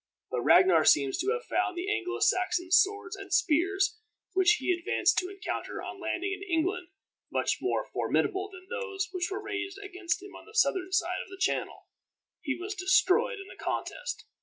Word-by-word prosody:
But 125 - -1
Ragnar 175 +3 +6
seems 140 -3 +4
to 395 - 0
have 470 +2 -1
found 365 0 -1
the 360 +2 -3
Anglo 380 -4 -1
Saxon 360 -1 +1
swords 385 +1 +3
and 395 0 -10
spears 390 +2 +2 0.3
which 375 +2 +5
he 430 - 0
advanced 355 +1 +2
to 365 - -4
encounter 395 -1 -5
on 370 - -7
landing 355 +3 -2
in 395 - -7
England 360 -1 -1 0.4
much - - 0
more - - 0
formidable 390 0 0
than 370 -1 -12
those 400 -5 -3
which 360 -1 -2
were 400 +2 -4
raised 395 -1 -4
against 380 -3 -3
him 400 - -11
on - - -13
the 435 - -15
southern 375 -4 +2
side 360 0 +1
of - - -10
the 385 - -10
Channel. - - -1 0.6
He 275 -3 -2
was 390 +3 -4
destroyed 380 +5 +3
in 390 - -8
the - - -12
contest. - - -3
375 Hz, 185 wpm, -29 LUFS, 360-400 Hz, 0.6 s, Ragnar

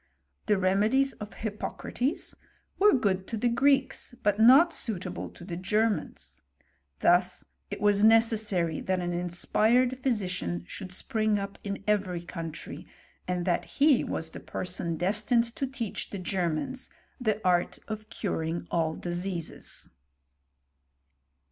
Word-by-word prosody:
The 210 - +4
remedies 210 +9 +3
of 210 +1 -7
Hippo 215 -2 -4
crates 270 +6 -2 0.4
were 415 -2 +6
good 190 -5 0
to 225 - -3
the 240 +3 +2
Greeks, 270 0 +2
but 205 0 +2
not 270 +10 +7
suitable 210 - -4
to 175 - -13
the 175 -2 -5
Germans; 190 - -1 0.6
thus 180 +1 +3 0.2
it 200 - -5
was 205 0 +3
necessary 215 -7 +3
that 185 -1 0
an 175 0 -2
inspired 220 +8 +2
physician 180 - -1
should 185 - -7
spring 215 +1 0
up 200 0 -5
in 200 -1 -4
every 190 -5 0
country, 165 -2 -7 0.4
and 180 -1 -1
that 175 - +1
he 285 -2 +3
was 160 0 -3
the - - -8
person 175 -2 -4
destined 230 +6 +1
to 270 - -1
teach 250 -5 -4
the 200 - -5
Germans 185 - -2 0.3
the 215 -4 0
art 175 -1 +2
of 215 0 -6
curing 170 -4 -2
all 160 -2 +1
diseases. 175 -1 -3
200 Hz, 130 wpm, -28 LUFS, 175-230 Hz, 0.6 s, not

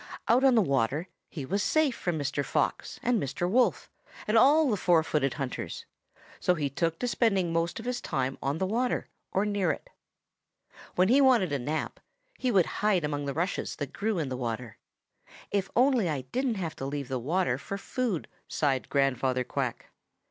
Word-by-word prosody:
Out 245 +3 +4
on 265 -2 +6
the 220 - +5
water 140 +4 0 0.2
he 145 -6 -6
was 200 +8 0
safe 310 -2 +2
from 175 -3 -2
Mr. 140 -1 -1
Fox - - -1
and 240 -4 +2
Mr. 145 +6 -2
Wolf 240 +7 +2 0.4
and 215 - +1
all 290 +7 +6
the 275 - +1
other 210 - +1
four 170 -3 +3
footed 145 -4 0
hunters. 135 -4 -5 0.5
So 180 - +2
he 145 -4 -2
took 165 +3 -1
to 250 - -2
spending 195 -6 +1
most 165 +5 0
of 225 - -8
his 245 0 -2
time 135 0 -2
on 140 +3 -1
the 190 - 0
water 240 +6 -1 0.2
or 195 +2 +1
near 200 -4 0
it. - - -4 1.0
When 185 +1 +4
he 270 +4 +6
wanted 245 - +4
a 140 - 0
nap, 150 +5 -3 0.4
he 255 - 0
would 190 -7 +4 0.2
hide 205 -5 +3
among 145 -1 -2
the 140 - -2
rushes 175 +4 -2
that 145 -3 -5
grew 215 0 -1
in 155 -5 -1
the 130 - -3
water. 115 -2 -4 0.7
'If 195 -1 0
only 250 -6 +4
I 145 -4 -1
didn't 245 - -1
have 175 -5 -4
to 135 - -4
leave 140 -1 -4
the 130 0 -2
water 145 0 0
for 195 - -5
food!' 225 - -2 0.2
sighed 135 -4 0
Grandfather 130 -2 +1
Quack. - - -4
175 Hz, 190 wpm, -28 LUFS, 140-220 Hz, 1.0 s, on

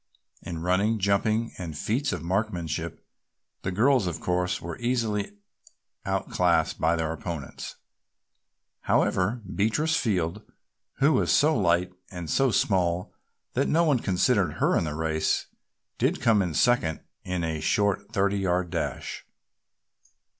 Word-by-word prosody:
In 85 -1 -6
running, 100 +5 +2
jumping 105 +3 +1
and 80 -4 -5
feats 120 - 0
of - - -4
marksmanship 90 -3 -2 0.6
the 95 - -2
girls 120 +2 +3
of 85 - -3
course 90 0 0
were 85 -1 -7
easily 110 -5 -1 0.7
outclassed - - +1
by 80 +1 +3
their 80 -1 -1
opponents; 80 -4 -6 1.0
however, 105 +6 +1
Beatrice 110 - +1
Field, 95 -3 0 0.5
who 145 +3 +3
was 130 - +2
so 155 +2 +4
light 90 -3 +2 0.2
and 90 -5 -6
so 135 -1 +3
small 90 -5 +1 0.4
that - - +1
no 165 +2 +3
one 145 -6 +3
considered 100 +1 +2
her - - +1
in - - +1
the 75 -1 -3
race, 80 0 0 0.5
did - - +1
come 110 -3 +4
in 85 -5 -2
second 100 - +2 0.2
in 90 -2 -2
a 80 -1 -2
short 100 0 +1
thirty 100 -2 +1
yard 90 -2 0
dash. - - -3
95 Hz, 130 wpm, -26 LUFS, 85-110 Hz, 1.0 s, so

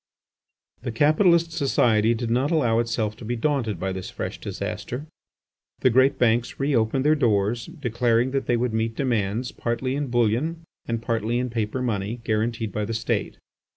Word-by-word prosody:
The 120 0 -3
capitalist 165 - +4
society 120 -7 +2
did 115 0 -3
not 130 +4 +2
allow 120 -9 +2
itself 115 -2 -1
to - - -11
be 120 +2 -2
daunted 120 - -1
by 95 +2 -2
this 95 -1 -5
fresh - - -5
disaster. 130 +5 -5 0.8
The 130 - +4
great 130 +3 +4
banks 120 0 +1
re 140 0 +1
opened 115 +4 +1
their 150 - +5
doors, 115 -4 +1
declaring 120 -3 0
that 135 0 -1
they 120 - +2
would 120 -1 -1
meet 110 0 -1
demands 115 -2 -1
partly 125 +2 -2
in 145 0 -2
bullion 120 +8 0 0.2
and 115 -1 -2
partly 115 0 0
in 125 -1 -2
paper 115 +2 -2
money 110 0 -2
guaranteed 110 0 -1
by 105 +3 -2
the 110 +2 -3
State. 115 +1 -2
120 Hz, 170 wpm, -24 LUFS, 110-130 Hz, 0.8 s, their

